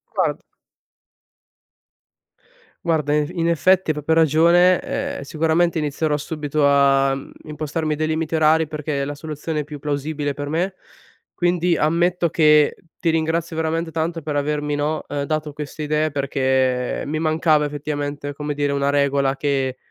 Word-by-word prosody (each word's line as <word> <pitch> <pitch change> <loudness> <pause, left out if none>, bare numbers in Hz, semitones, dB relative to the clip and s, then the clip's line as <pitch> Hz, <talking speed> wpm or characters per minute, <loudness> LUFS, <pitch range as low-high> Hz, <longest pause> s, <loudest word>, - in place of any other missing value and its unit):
Guard - - 0 2.4
Guarda 155 -3 +1
invi 150 +4 -1
in 165 - +1
effetti 180 +1 +3
hai - - -1
proprio 150 +2 0
ragione, 170 +3 +5
ehm, 280 0 -4
sicuramente 165 +1 +1
inizierò 150 0 0
subito 150 -1 -1
a, 135 -1 +4
mhmm, 135 0 -7
impostarmi 155 +1 -3
dei 155 +1 -1
limiti 160 0 -2
orari, 160 0 +3
perché 150 -2 -3
è - - -2
la 145 - -4
soluzione 150 +1 -4
più 150 +1 -8
plausibile 145 0 -3
per 145 +1 -5
me, 175 +5 -1 0.6
quindi 175 -1 +1
ammetto 170 +2 +1
che 150 -2 +4 0.2
ti 165 - +1
ringrazio 160 +1 -1
veramente 160 +1 -1
tanto 165 0 -2
per 150 -1 -3
avermi, 150 0 -1
no, 150 +2 -1
uhm, 145 -1 -3
dato 155 -1 -2
queste 150 +1 -6
idee 155 +1 +1
perché 130 -3 0
mi 155 +2 -2
mancava 155 -1 +2
effettivamente, 145 -1 -4
come 150 0 -4
dire, 145 0 0
una 140 0 0
regola 140 -1 +1
che 135 -2 -1
150 Hz, 150 wpm, -21 LUFS, 145-160 Hz, 2.4 s, ragione